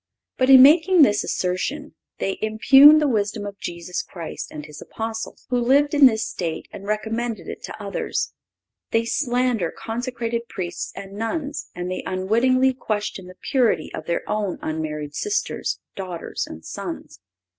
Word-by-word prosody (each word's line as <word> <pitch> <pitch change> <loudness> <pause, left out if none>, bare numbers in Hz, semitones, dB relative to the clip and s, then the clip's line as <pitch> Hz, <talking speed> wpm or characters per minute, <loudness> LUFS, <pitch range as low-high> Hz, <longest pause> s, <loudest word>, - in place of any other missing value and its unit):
But 255 0 +2
in 260 -1 +10
making 320 +4 +6
this 210 -5 +3
assertion 185 +11 -2 0.2
they 195 - -2
impugn 270 +8 +7
the 305 -1 +3
wisdom 210 -3 -1
of 200 0 -8
Jesus 175 +1 -4
Christ 170 -4 -7
and 150 -1 -8
His 150 -1 -11
Apostle, 225 0 -5
who 250 0 +1
lived 280 +5 +3
in 285 -2 +8
this 220 -3 0
state 175 -7 -4
and 200 - -9
recommended 220 +2 -2
it - - -7
to 220 - -9
others; 200 -1 -3 0.6
they 230 0 +1
slander 245 - 0
consecrated 235 0 -4
Priests 185 -5 -5
and 195 0 -8
nuns, 280 +8 -4
and 180 +1 -4
they 185 - -3
unwittingly 240 +8 +2
question 210 -6 -4
the 185 - -12
purity 240 - +1
of 155 - -7
their 170 - -2
own 205 -4 -1
unmarried 150 -2 -4
sisters, 410 - -2 0.2
daughters 185 -3 -5
and 80 - -10
sons. - - -7
220 Hz, 155 wpm, -23 LUFS, 185-255 Hz, 0.6 s, in